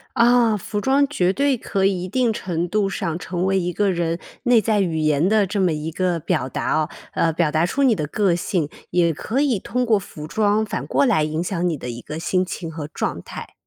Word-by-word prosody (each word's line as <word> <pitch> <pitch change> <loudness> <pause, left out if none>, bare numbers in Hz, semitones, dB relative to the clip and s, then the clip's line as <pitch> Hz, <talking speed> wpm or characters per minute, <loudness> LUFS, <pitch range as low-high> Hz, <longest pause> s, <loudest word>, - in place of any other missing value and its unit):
啊， 235 -2 +4
服 210 +1 -4
装 270 +5 +3
绝 185 -11 +1
对 280 +4 +1
可 195 -3 -1
以 185 -2 0
一 - - -5
定 245 +3 +1
程 175 -4 -3
度 205 +1 +1
上 180 -4 -3
成 180 +1 -2
为 195 0 +2
一 180 -1 -1
个 205 +2 +1
人 170 -1 -1 0.2
内 245 -3 +5
在 215 0 +1
语 170 -4 0
言 155 +2 +2
的 215 0 +4
这 195 +1 -2
么 180 -3 +3
一 155 +1 -3
个 175 0 -1
表 130 - -1
达 - - -2
哦 155 - -1 0.3
呃， 165 - +2
表 160 -1 +1
达 160 +2 +2
出 280 +10 -1
你 250 -5 +4
的 155 -4 -2
个 195 +4 +1
性， 170 -3 -1 0.2
也 170 -2 +3
可 225 - -2
以 275 -7 +2
通 250 +6 -2
过 225 -3 +3
服 155 -5 -9
装 210 +3 +2
反 215 - -4
过 - - +2
来 215 - +3
影 155 +2 -2
响 180 -1 -1
你 165 - -1
的 125 - -7
一 120 0 -6
个 150 - -7
心 185 +2 +1
情 170 -2 -5
和 155 -2 -6
状 150 - -3
态。 - - -9
185 Hz, 255 characters per minute, -22 LUFS, 165-215 Hz, 0.3 s, 内